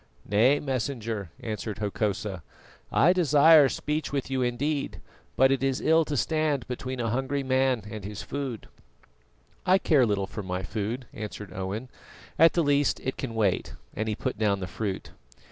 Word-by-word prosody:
"Nay, 120 +8 +4
Messenger," 115 - -3
answered 110 -1 -4
Hokosa, 100 -2 -2 0.5
"I 175 +5 +5
desire 155 -3 +6
speech 150 0 -2
with 140 -1 -2
you 130 -1 0
indeed, 140 +4 -1 0.4
but 135 +1 +5
it 135 0 +1
is 135 -1 +1
ill 160 0 +3
to 150 -1 -2
stand 155 -4 0
between 130 +1 -5
a 115 -2 -1
hungry 135 +3 -1
man 130 -2 +1
and 105 -2 -7
his 105 +1 -6
food." 135 -6 -5 1.0
"I 185 +1 +5
care 145 -9 +3
little 100 -2 0
for 105 +3 -6
my 90 -1 -4
food," 110 +6 -3
answered 105 -1 -7
Owen; 95 +6 -4 0.5
"at 165 +1 +7
the 170 - +2
least 145 -1 +2
it 130 - -3
can 115 -4 -5
wait," 105 -4 0 0.2
and 110 +1 -2
he 105 - -1
put 125 -1 -3
down 100 -3 +2
the 95 - -3
fruit. 95 +1 -4
125 Hz, 165 wpm, -27 LUFS, 105-140 Hz, 1.0 s, at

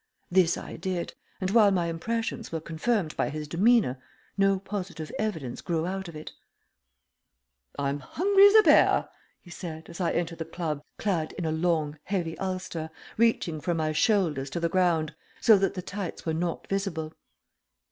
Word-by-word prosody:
This 180 -2 +4
I - - -7
did, 185 -2 -3 0.3
and 185 0 -1
while 215 -2 +6
my 180 -3 +1
impressions 225 +8 -3
were 165 - -2
confirmed 165 +2 -1
by - - 0
his 150 0 -5
demeanor, 175 - +3 0.3
no 195 -1 +3
positive 190 -5 -5
evidence 160 - -3
grew 165 -2 -1
out 190 +1 -3
of 170 - -9
it. 155 - -8 1.5
"I'm 140 0 -1
hungry 395 - +5
as 405 - +4
a 435 - +9
bear!" - - +5 0.3
he 175 - -15
said, 160 -3 -7
as 170 - -7
I 170 - +1
entered 170 -1 -2
the - - -1
club, 160 -3 -3 0.2
clad 175 -7 -1
in 180 - -4
a 160 - 0
long, 160 -2 0
heavy 175 -5 -2
ulster, 185 -4 -3 0.3
reaching 215 -9 +1
from 170 +1 -1
my 155 -1 0
shoulders 155 - +1
to 170 - -3
the 170 0 0
ground, 165 -3 +2 0.3
so 225 - +7
that 195 -1 0
the 180 - -4
tights 200 -2 -5
were 160 - 0
not 170 +1 -2
visible. 170 -6 -2
175 Hz, 170 wpm, -27 LUFS, 160-195 Hz, 1.5 s, a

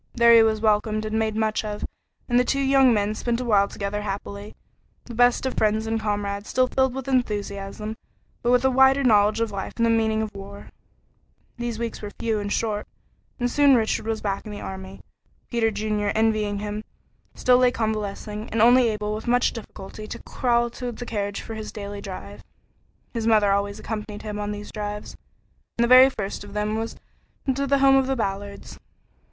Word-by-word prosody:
There 235 -1 +6
he 230 - +8
was 220 -1 +2
welcomed 215 0 +1
and 215 +1 -1
made 220 -1 0
much 220 0 0
of, 210 -1 -4 0.4
and 245 0 +3
the - - +4
two 275 +2 0
young 270 -1 +5
men 210 -1 +1
spent 235 +2 -2
a 250 - -3
while 200 -4 +4
together 205 +1 -4
happily, 200 0 -6 0.5
the 240 - -9
best 245 +2 +3
of 260 - -1
friends 215 +1 +1
and 225 0 -1
comrades, 205 -1 -3
still 255 0 +3
filled 265 0 +1
with 270 -1 -5
enthusiasm, 210 -4 -2 0.5
but 240 - 0
with 250 +1 +4
a 265 - +4
wider 265 +2 +5
knowledge 215 -2 +4
of 225 -2 0
life 195 -1 -5
and 230 - +2
the 230 - +3
meaning 220 -1 +1
of 215 - -6
war. 200 +1 -10 0.9
These 240 -1 -3
weeks 230 0 -4
were 205 - -5
few 225 -2 0
and 205 0 -4
short, 210 -2 -1 0.5
and 245 - +1
soon 285 -1 +5
Richard 220 -1 0
was 225 -1 -2
back 200 -1 -2
in 215 - -8
the 205 - -6
army. 190 0 -8 0.5
Peter 235 -2 +2
Junior, 210 -1 -1
envying 215 -2 +1
him, 210 +1 -4 0.5
still 250 0 +4
lay 250 -1 +5
convalescing 215 -2 -3
and 225 - -2
only 240 +2 +6
able 210 -1 -2
with 215 +2 -6
much 245 +1 +2
difficulty 215 -1 -9
to - - -8
crawl 240 -1 0
to 245 0 -5
the 245 +1 -7
carriage 205 -3 -3
for 225 - -7
his 220 -1 -6
daily 205 -1 -7
drive. 105 - -8 0.7
His 230 -1 -2
mother 210 -3 +4
always 200 +1 0
accompanied 210 -2 -6
him 210 -1 -5
on 205 0 -3
these 205 0 -7
drives, 210 -1 -5 0.6
and 235 - +3
the - - +3
very 255 +2 +8
first 200 -6 -5
of 205 -1 -11
them 210 0 -1
was 225 +1 -3 0.6
to 275 +1 -2
the 280 +1 +3
home 270 0 +5
of 265 -1 +2
the 270 - 0
Ballards. 200 -3 -5
220 Hz, 200 wpm, -24 LUFS, 205-240 Hz, 0.9 s, he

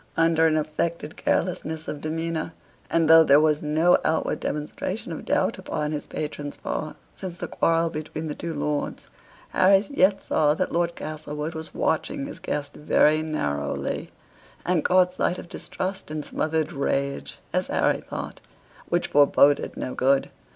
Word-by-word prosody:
Under 165 0 +4
an 155 -1 +2
affected 155 +1 -2
carelessness 160 -3 -1
of 145 - -5
demeanor, 160 +1 -3 0.4
and 165 -1 +2
though 165 0 +9
there 145 -2 +6
was 150 -1 +2
no 155 +4 +3
outward 160 - 0
demonstration 150 0 -4
of - - -6
doubt - - +1
upon 150 0 -3
his 150 -1 -4
patron's 145 -1 -5
part 155 -1 -4 0.2
since 185 -3 -6
the - - -5
quarrel 165 0 +1
between 155 +1 -5
the 150 - -3
two 170 +2 -5
lords, 145 0 -3 0.4
Harry 195 +2 +4
yet 195 -7 +3
saw 150 -1 +2
that 185 - -1
Lord 170 0 0
Castlewood 155 +1 -5
was 160 0 -7
watching 275 - 0
his 280 - -7
guest 145 -1 -3
very 155 +1 +3
narrowly; 70 - -2 0.6
and 175 -3 +2
caught 180 0 +4
sight 180 -1 0
of - - -8
distrust 190 +2 -4
and 155 -1 -4
smothered 160 +1 -1
rage 140 -1 -2 0.2
(as - - +1
Harry - - +2
thought) - - -7 0.5
which 175 0 0
foreboded 145 0 +4
no 130 - -3
good. 135 +1 +2
155 Hz, 155 wpm, -25 LUFS, 150-170 Hz, 0.6 s, though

